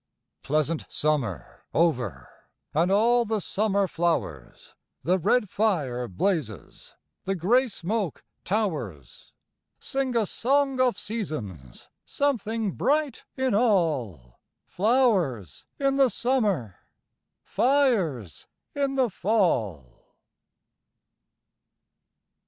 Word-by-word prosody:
Pleasant 155 +2 -1
summer 140 - -2
over 120 - 0 0.5
And 170 +5 +2
all 235 +4 +4
the 220 -1 -1
summer 200 0 0
flowers, 160 - -3 0.3
The 185 +3 +2
red 210 +5 +2
fire 150 - 0
blazes, 110 - -3 0.3
The 195 - -1
grey 235 +10 +3
smoke 200 - -3 0.2
towers. 150 - -3 0.5
Sing 265 -2 -2
a 225 - +2
song 270 +5 +1
of 250 -2 +2
seasons! 110 - -5 0.2
Something 225 -6 -1
bright 295 +1 0
in 260 -2 +1
all! 150 - 0 0.3
Flowers 185 - +1
in 275 -1 +1
the 270 -2 +5
summer, 205 - -1 0.6
Fires 215 - +1 0.3
in 280 -1 -1
the 260 -2 +3
fall! 140 - -1
195 Hz, 90 wpm, -26 LUFS, -, 0.6 s, the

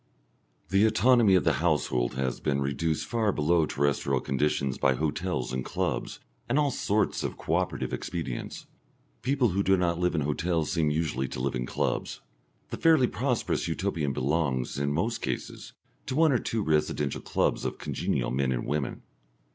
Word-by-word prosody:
The 95 +1 +4
autonomy 110 -1 +5
of 90 - +3
the - - +3
household 65 -7 +1
has 65 -1 -2
been 70 -1 0
reduced 75 +3 -1
far 115 -3 +1
below 80 0 +2
terrestrial 70 -1 0
conditions 65 0 -1
by 65 -1 +3
hotels 80 +1 -2
and 65 0 -2
clubs, - - -2 0.3
and 125 - +2
all 145 -2 +3
sorts 105 -3 0
of - - -3
co 80 - -3
operative 90 +1 -1
expedients. 80 -9 -4 0.6
People 130 -2 +2
who 95 +2 0
do 95 0 +3
not 85 -1 0
live 90 -1 +1
in 75 - +1
hotels 80 +2 0
seem 80 -3 +1
usually 75 -4 -1
to 60 - -6
live 65 +2 -1
in 60 -1 -3
clubs. - - -2 0.5
The - - -3
fairly 160 -5 +5
prosperous 125 +1 -1
Utopian 75 -4 -1
belongs, 65 -1 -1
in 70 0 0
most 115 +10 -1
cases, - - -5 0.3
to 130 - -2
one 160 0 +5
or 125 - +3
two 110 -1 -2
residential 75 -3 0
clubs - - 0
of - - -3
congenial - - -2
men 65 0 0
and - - -2
women. 75 -2 -2
80 Hz, 170 wpm, -28 LUFS, 70-100 Hz, 0.6 s, autonomy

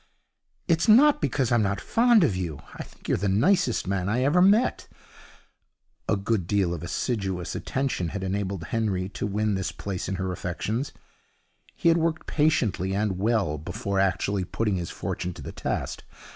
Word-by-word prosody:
'It's 165 -1 +2
not 280 +7 +6
because 135 -4 0
I'm 120 -2 +4
not 100 -1 0
fond 235 -3 +4
of 125 -12 +2
you. 85 -6 -4
I - - -7
think - - -12
you're - - +1
the 100 +1 0
nicest 120 - +2
man 95 0 -1
I 120 +4 +1
ever 150 +7 +4
met.' 205 +6 +3 1.2
A - - +4
good 100 -3 -1
deal 95 -4 +1
of 85 - -5
assiduous 95 -1 -2
attention 135 -10 -2
had 95 +4 -5
enabled 95 -1 -2
Henry 95 -3 -1
to 105 - -4
win 105 +1 0
this 95 -1 -2
place 95 -2 -5
in 95 - -1
her 95 0 -2
affections. 105 - -3 0.8
He 170 - +2
had 165 +1 +4
worked 160 -1 -1
patiently 110 - +1
and 100 -2 -1
well 100 -8 +1
before 95 +5 -3
actually 95 +1 +1
putting 105 +1 -1
his 85 -1 -4
fortune 90 -1 -4
to 85 - -9
the - - -6
test. - - -3
100 Hz, 170 wpm, -26 LUFS, 95-130 Hz, 1.2 s, not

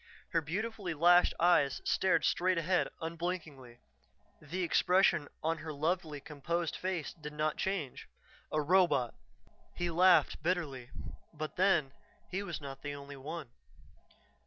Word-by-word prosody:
Her 165 - +2
beautifully 195 +2 -3
lashed 175 +3 +5
eyes 165 -6 +4
stared 190 - +2
straight 185 +1 +2
ahead 175 +2 +2
unblinkingly; 160 -7 -5 0.6
the 170 +5 -3
expression 175 -3 +3 0.2
on 165 +1 0
her 155 - -6
lovely 155 0 -1
composed 160 +4 -3
face 185 -4 -3
did 150 -3 -9
not 155 0 0
change. 185 -9 -3 0.4
A 155 - +1
robot! 170 -7 +3 0.6
He 175 -1 -1
laughed 180 0 +4
bitterly. 150 -8 -2 0.5
But 155 0 -5
then, 175 -7 +3 0.4
he 190 +2 -1
was 185 -5 -5
not 135 -2 -8
the 145 0 -5
only 140 0 -9
one.... 145 -1 -7
165 Hz, 130 wpm, -32 LUFS, 145-180 Hz, 0.6 s, lashed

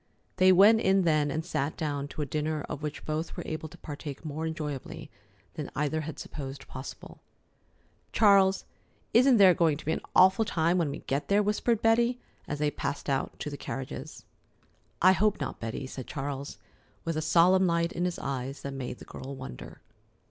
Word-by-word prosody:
They 185 0 +6
went 205 +5 +7
in 190 0 +3
then 155 -3 +2
and 160 +3 -3
sat 145 -4 -2
down 145 -3 -2
to 150 - -4
a - - -2
dinner 150 +1 -2
of 145 - -6
which 150 -1 -5
both 155 +2 -3
were - - -4
able 155 0 -5
to - - -14
partake 145 0 -8
more 155 +2 -3
enjoyably 150 -1 -5 0.4
than 150 - -5
either 150 +2 0
had 155 0 -6
supposed 135 -2 -7
possible. 130 +1 -9 0.9
"Charles, 195 -3 +4 0.5
isn't 255 +1 +6
there 190 -3 +8
going 160 -4 +2
to - - -12
be 160 - 0
an - - -1
awful 190 +4 +6
time 170 -2 +1
when 160 -4 +1
we - - -6
get 140 +1 -2
there?" 205 +1 +3
whispered 210 +2 0
Betty, 235 +2 +3 0.3
as 145 - -3
they 150 0 +1
passed 140 0 -3
out 135 - -2
to 150 - -4
the 145 - -6
carriages. 135 -2 -7 0.8
"I 185 - +8
hope 210 +2 +2
not, - - -4
Betty," 115 +4 -4
said 130 -1 -7
Charles, 140 0 -5 0.5
with 165 -1 -1
a 155 - -1
solemn 180 +4 +4
light 170 0 +1
in 175 - -2
his 180 - -2
eyes 135 +1 -4
that 140 - -4
made 125 -2 -5
the - - -12
girl 135 +1 -8
wonder. 65 - -9
155 Hz, 190 wpm, -29 LUFS, 140-185 Hz, 0.9 s, there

